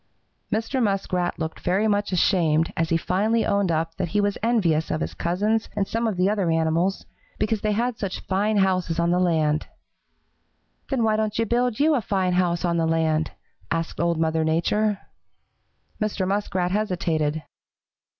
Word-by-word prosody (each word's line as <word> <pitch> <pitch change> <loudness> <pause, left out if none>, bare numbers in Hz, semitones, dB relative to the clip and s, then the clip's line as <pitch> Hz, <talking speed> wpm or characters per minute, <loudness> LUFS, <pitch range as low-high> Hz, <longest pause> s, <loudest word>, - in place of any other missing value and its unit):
"Mr. 225 +5 -1
Muskrat 190 -4 0
looked 160 -1 -4
very 195 +5 +1
much 205 -1 0
ashamed 165 -3 +2
as 165 0 0
he 165 - +3
finally 215 +7 +1
owned 200 -3 +1
up 165 0 -1
that 185 - -1
he 190 +6 0
was 205 0 +1
envious 185 -9 +1
of 155 - -1
his - - -3
cousins 210 +6 0
and 200 -2 0
some 230 +1 -1
of 210 -5 -2
the 180 +1 +3
other 200 -4 +1
animals, 165 +4 +1 0.3
because 215 0 0
they 210 0 +1
had 235 +2 -1
such 195 -2 -3
fine 205 +3 0
houses 185 -4 +1
on 170 0 +2
the 180 - +2
land. 160 -4 +1 1.2
"'Then 260 -4 0
why 220 -1 +3
don't 215 -1 -1
you 230 - +2
build 240 0 0
you 310 +2 +4
a 265 - +1
fine 190 -3 0
house 180 -1 +1
on 170 -1 +1
the 165 -1 +1
land?' 160 -1 +1 0.4
asked 165 0 -2
Old 170 -1 +1
Mother 160 0 +1
Nature. 200 +6 +1 1.0
"Mr. 205 -3 -1
Muskrat 190 -2 -1
hesitated. 165 -7 -1
185 Hz, 170 wpm, -24 LUFS, 165-215 Hz, 1.2 s, you